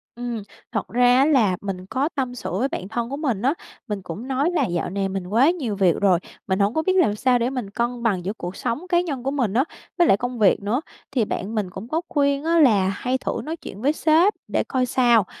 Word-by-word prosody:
Ừm. 240 -3 -4 0.3
Thật 215 -4 -2
ra 245 +1 +4
á 270 - +5
là 230 -12 +3
mình 190 -2 -5
có 265 +9 -1
tâm 255 -3 -2
sự - - -5
với 265 - +2
bạn 185 - -5
thân 235 +2 -3
của 280 - -4
mình 255 -10 -1
á, 265 +5 +2 0.3
mình 205 -3 -3
cũng 190 +7 -7
nói 270 +4 +1
là 350 - +1
dạo 175 -2 -2
này 195 +1 -2
mình 190 -1 -4
quá 235 - +4
nhiều 275 - -2
việc 185 -4 +3
rồi, 190 -4 +4 0.3
mình 190 +1 0
hổng 200 +2 +2
có 315 - +1
biết 375 - +2
làm 320 - +3
sao 250 +3 +2
để 240 +1 +1
mình 250 -6 -4
cân 235 +3 -2
bằng 190 -6 0
giữa 200 - -1
cuộc 180 -3 -7
sống 295 +10 -3
cá 345 -1 +4
nhân 285 -8 -4
của 270 - -1
mình 245 -9 0
á, 250 +4 +3 0.3
với 345 -2 +4
lại 195 - +5
công 245 +1 -4
việc 205 -3 +4
nữa. 235 +8 0 0.3
Thì 240 -5 +1
bạn 205 +2 -4
mình 205 -4 -1
cũng 190 +5 -8
có 315 +6 -1
khuyên 280 -1 +1
á 335 +1 +3
là 210 -10 +5
hay 250 +7 -1
thử - - -3
nói 315 +2 -4
chuyện 210 -10 -10
với 285 +3 +2
sếp 325 +6 +4
để - - 0
coi 255 -1 0
sao, 240 -4 +3
240 Hz, 255 wpm, -23 LUFS, 200-275 Hz, 0.3 s, á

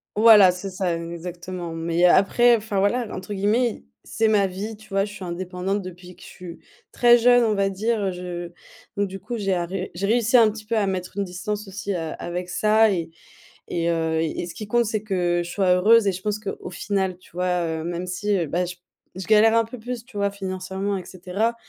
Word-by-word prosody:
voilà, 210 -3 +8
c'est 185 +2 -6
ça, 180 -2 -1
exactement, 170 +1 -6
mais 165 +2 +1
après, 235 +7 +5
enfin 210 -2 -3
voilà, 230 +5 +1
entre 190 +3 -6
guillemets 210 +5 +2
i - - -10 0.3
«c'est 225 -1 +1
ma 205 -2 +3
vie», 205 +4 -6
tu 215 - -17
vois? 195 0 +1
Je 205 - -5
suis 195 -2 -8
indépendante 180 +3 -3
depuis 180 0 -10
que - - -20
je - - -12
suis 175 -2 -10 0.3
très 240 0 +6
jeune, 245 +1 +5
on 220 -2 +2
va 195 0 +1
dire, 220 +4 -1
heu, 195 -1 0
je 175 -1 -6 0.4
donc, 200 -1 -1
du 195 - -7
coup, 240 +4 -5
j'ai 195 -3 0
arrê 180 +2 -3
j'ai 195 +3 -2
réussi 230 +2 +3
un 225 -2 +6
petit 215 0 -8
peu 225 +1 -1
à 205 - +1
mettre 185 0 -4
une 200 - 0
distance 205 +3 -5
aussi 200 +1 -4
a 165 -3 -3
avec 175 +1 -5
ça, 215 +4 +3
et 170 -3 -3 0.6
et 170 0 -1
heu, 160 -1 0
et 165 +2 -2
ce 175 - -8
qui 210 +2 -8
compte, 240 +2 +2
c'est 215 0 -2
que 180 -4 0
je 170 - -8
sois 185 0 +2
heureuse! 215 +4 +5
Et - - +4
je 185 0 -7
pense 210 +1 -1
qu'au 200 -3 -6
final, 190 0 -2
tu 185 - -22
vois? 180 -1 0
Heu, 160 -1 -3
même 175 +2 -4
si, 200 +3 -1
heu, 170 - 0
bah, 175 +5 0
j 180 0 -7 0.4
je 185 0 -6
galère 220 +1 +5
un 230 - +3
peu 240 +3 -9
plus, 240 +1 -6
tu 240 - -20
vois? 200 0 +1
Financièrement 190 0 -4
et 185 - -6
cetera. 195 +6 -2
195 Hz, 230 wpm, -23 LUFS, 180-215 Hz, 0.6 s, voilà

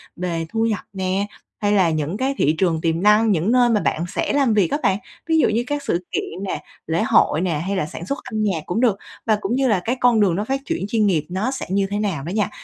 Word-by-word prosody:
về 170 -2 -2
thu 225 +3 0
nhập 220 -2 0
nè, 190 +1 -1 0.3
hay 205 -1 +1
là 190 -4 +4
những 155 +3 -2
cái 265 +3 0
thị 155 +2 +2
trường 165 -3 +1
tiềm 165 +1 0
năng, 210 +1 +5
những 180 +4 +1
nơi 245 -1 +4
mà 215 -3 +2
bạn 165 - 0
sẽ - - 0
làm 275 -5 +3
việc 200 -6 +2
á - - +2
bạn, 190 - +3 0.3
ví 320 -1 +3
dụ - - +4
như 230 +3 +1
các 290 +1 -2
sự 175 +1 -1
kiện 185 +4 -3
nè, - - -4 0.2
lễ 165 +1 +1
hội 160 - +3
nè, 170 -5 0
hay 200 - -1
là 185 - 0
sản 160 +2 -8
xuất 280 +9 -2
âm 220 -4 -3
nhạc 185 -7 -1
cũng 215 +7 -1
được, 225 -6 +3 0.3
và 220 - +3
cũng 210 +5 -1
như 265 0 +2
là 210 -6 +3
cái 230 +7 -1
con 245 -3 +4
đường 195 -5 +3
nó 200 - -1
phát 270 +3 -1
chuyển 190 - -2
chuyên 220 -1 +1
nghiệp 165 -7 +1
nó 195 +8 -1
sẽ 265 - -4
như 195 +1 +1
thế 205 +1 -2
nào 190 -10 -2
đó 160 - -5
nha, 210 -1 0
200 Hz, 275 wpm, -21 LUFS, 175-225 Hz, 0.3 s, năng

